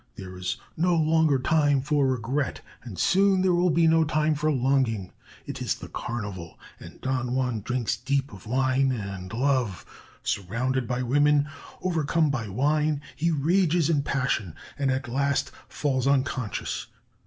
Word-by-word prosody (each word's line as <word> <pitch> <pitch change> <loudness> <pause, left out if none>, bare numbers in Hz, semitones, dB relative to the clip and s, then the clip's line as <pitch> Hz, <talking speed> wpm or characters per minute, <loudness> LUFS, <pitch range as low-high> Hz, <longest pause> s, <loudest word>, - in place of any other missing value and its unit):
There 95 -1 -8
is 90 0 -3 0.2
no 175 +2 +2
longer 160 -2 +3
time 145 +1 +2
for 145 -1 +2
regret, 130 +3 -1 0.2
and 110 -6 -9
soon 195 0 +3
there 185 -1 +3
will 175 +1 +3
be 165 0 +3
no 160 0 +5
time 155 0 +1
for 155 +1 0
longing. 125 -7 +1 0.3
It - - -6
is - - 0
the - - -10
Carnival, 100 -8 -5 0.2
and - - -12
Don 130 -1 -1
Juan 125 -4 -1
drinks 125 +1 -1
deep 140 -3 -1
of 100 +1 -12
wine 130 +2 +2
and 100 -5 -5
love.... 120 - 0 0.4
Surrounded 120 +6 -1
by 125 0 -1
women, 145 +3 +3 0.4
overcome 160 -3 +1
by 120 -5 -2
wine, 150 +7 +1 0.2
he 165 +3 0
rages 165 +1 +2
in 145 -3 +2
passion, 125 - -1 0.2
and 140 -1 0
at 130 0 -1
last 140 +3 0 0.2
falls 130 0 -1
unconscious.... 130 -4 -1
135 Hz, 155 wpm, -26 LUFS, 120-155 Hz, 0.4 s, no